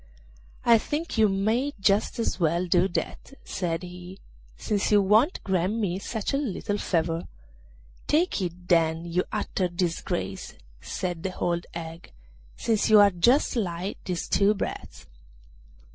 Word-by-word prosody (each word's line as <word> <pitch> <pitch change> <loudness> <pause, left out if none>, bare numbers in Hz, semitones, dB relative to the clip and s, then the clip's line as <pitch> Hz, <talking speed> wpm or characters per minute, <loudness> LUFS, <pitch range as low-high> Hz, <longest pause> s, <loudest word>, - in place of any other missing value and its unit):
'I 230 -1 +6
think 295 0 -3
you 215 -1 +5
may 220 +9 0
just 195 +2 +2
as 230 -5 -1
well 170 +1 +1
do 175 +1 +3
that,' 195 +8 -5
said 175 -1 -2
he, 180 +1 -9 0.4
'since 205 -1 -1
you 205 - +6
won't 215 - +3
grant 190 +1 0
me 195 -5 -1
such 220 +3 -3
a - - +2
little 210 -6 -2
favour.' 165 -1 -1 0.8
'Take 320 - +2
it, 175 0 -5
then, 165 -1 +2
you 175 +1 0
utter 200 -3 -1
disgrace!' 175 -1 -3 0.3
said 175 -3 -4
the 185 0 -5
old 170 0 -1
hag, 165 0 -8 0.4
'since 220 -2 0
you 215 -1 +8
are 205 -1 +7
just 240 - +3
like 185 -3 -3
these 180 -2 -3
two 205 +1 +3
brats. 200 - -6
190 Hz, 145 wpm, -26 LUFS, 175-215 Hz, 0.8 s, you